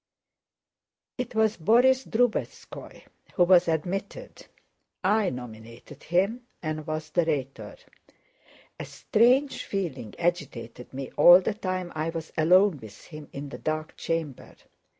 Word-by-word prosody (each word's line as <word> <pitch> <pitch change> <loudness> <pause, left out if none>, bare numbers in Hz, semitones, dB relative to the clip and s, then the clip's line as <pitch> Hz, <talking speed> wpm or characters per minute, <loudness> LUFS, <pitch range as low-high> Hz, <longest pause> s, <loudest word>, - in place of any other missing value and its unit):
It 245 -2 -4
was 220 0 +2
Borís 250 +9 +3
Drubetskóy 240 0 -2 0.3
who 180 - +4
was 180 0 +5
admitted. 175 +5 -4 0.6
I 205 +1 +2
nominated 120 +2 -10
him 200 +8 -1 0.2
and 155 0 -4
was 155 0 -4
the 175 - +2
Rhetor. 140 -4 -4 1.0
A - - -5
strange 255 +5 +2
feeling 150 - -4
agitated 170 -8 -3
me 135 0 -7
all 175 +4 +9
the 195 +3 -2
time 185 -3 -4
I 155 +1 -2
was 165 -1 -7
alone 180 +1 +4
with 110 -4 -12
him 155 -2 -11
in 140 +1 -7
the - - -9
dark 155 0 -4
chamber. 160 -5 -4
170 Hz, 125 wpm, -26 LUFS, 150-200 Hz, 1.0 s, all